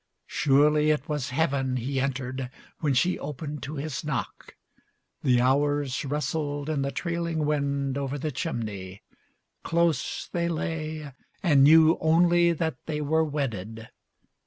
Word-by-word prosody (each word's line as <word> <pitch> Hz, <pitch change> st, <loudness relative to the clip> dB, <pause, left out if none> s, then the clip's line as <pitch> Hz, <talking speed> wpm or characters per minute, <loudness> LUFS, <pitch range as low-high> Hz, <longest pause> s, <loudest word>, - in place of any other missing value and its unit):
Surely 150 Hz, +2 st, +3 dB
it 150 Hz, -1 st, +1 dB
was 150 Hz, -3 st, -2 dB
Heaven 135 Hz, -2 st, 0 dB
He 130 Hz, +3 st, -2 dB
entered 130 Hz, -1 st, -3 dB, 0.3 s
when 145 Hz, -4 st, +1 dB
she 175 Hz, +9 st, +2 dB
opened 145 Hz, 0 st, -6 dB
to 145 Hz, +4 st, -6 dB
his 145 Hz, -1 st, -4 dB
knock. 140 Hz, -10 st, -5 dB, 0.7 s
The 125 Hz, -3 st, +3 dB
hours 140 Hz, +1 st, +1 dB
rustled 145 Hz, 0 st, -2 dB
in 145 Hz, -3 st, 0 dB
the 135 Hz, -, -1 dB
trailing 170 Hz, +1 st, -2 dB
wind 140 Hz, -2 st, 0 dB
Over 140 Hz, 0 st, -3 dB
the 150 Hz, +2 st, -3 dB
chimney. 105 Hz, -, -5 dB, 0.6 s
Close 165 Hz, -5 st, 0 dB
they 170 Hz, -1 st, 0 dB
lay 155 Hz, -3 st, -4 dB, 0.3 s
and 145 Hz, -7 st, +5 dB
knew 160 Hz, +3 st, +6 dB
Only 170 Hz, +2 st, +4 dB
that 160 Hz, -4 st, -2 dB
they 155 Hz, -2 st, -2 dB
were 160 Hz, +2 st, +2 dB
wedded. 115 Hz, -8 st, -4 dB
145 Hz, 135 wpm, -26 LUFS, 135-160 Hz, 0.7 s, knew